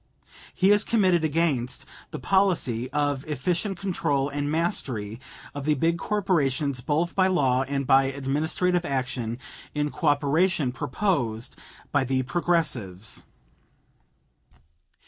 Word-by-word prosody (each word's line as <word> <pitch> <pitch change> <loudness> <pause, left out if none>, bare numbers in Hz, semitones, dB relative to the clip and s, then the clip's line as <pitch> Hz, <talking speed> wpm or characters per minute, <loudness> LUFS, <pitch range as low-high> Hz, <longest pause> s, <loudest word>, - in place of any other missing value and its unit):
He 190 +2 +4
is 205 0 +5
committed 185 -7 +2
against 150 -6 0 0.2
the - - -6
policy 130 - +1
(of 145 -1 0
efficient 170 - -1
control 165 -7 0
and 145 0 -2
mastery 125 -9 -1 0.3
of 145 -1 -5
the 150 0 +3
big 165 +4 +1
corporations 150 -11 0
both 155 +6 0
by 185 -1 +3
law 135 -9 +2
and 140 0 -1
by 135 +1 +5
administrative 150 +6 0
action 130 -5 -2 0.4
in 150 0 0
cooperation) 150 -1 +2
proposed 125 - -1 0.4
by 145 -2 +2
the 130 0 0
Progressives. 130 - -1
145 Hz, 110 wpm, -26 LUFS, 130-175 Hz, 0.4 s, is